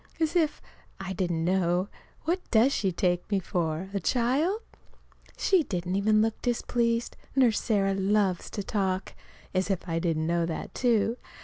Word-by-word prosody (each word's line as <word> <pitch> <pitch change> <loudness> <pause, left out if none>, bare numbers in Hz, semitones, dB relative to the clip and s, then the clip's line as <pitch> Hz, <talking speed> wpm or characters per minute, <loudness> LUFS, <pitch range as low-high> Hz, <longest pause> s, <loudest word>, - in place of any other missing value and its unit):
(As 320 +1 0
if 320 -4 +1 0.4
I 190 0 -4
didn't 175 -3 -1
know! 180 0 +1 0.4
What 345 +4 +1
does 240 +5 +4
she 195 -2 0
take 175 0 0
me 200 - +2
for 170 0 -2
a 200 - 0
child?) 265 - +1 0.8
She 380 -3 +3
didn't 180 - -3
even 215 +2 +3
look 225 -1 -2
displeased 235 -1 0 0.2
Nurse 245 -5 +4
Sarah 195 -3 +1
loves 195 -1 +1
to 205 - -4
talk. 190 -2 -1 0.4
(As 185 +1 0
if 190 -2 -2
I 165 -1 0
didn't 165 -2 0
know 170 0 +1
that, 165 - -5
too!) 235 -1 +2
195 Hz, 155 wpm, -28 LUFS, 180-235 Hz, 0.8 s, does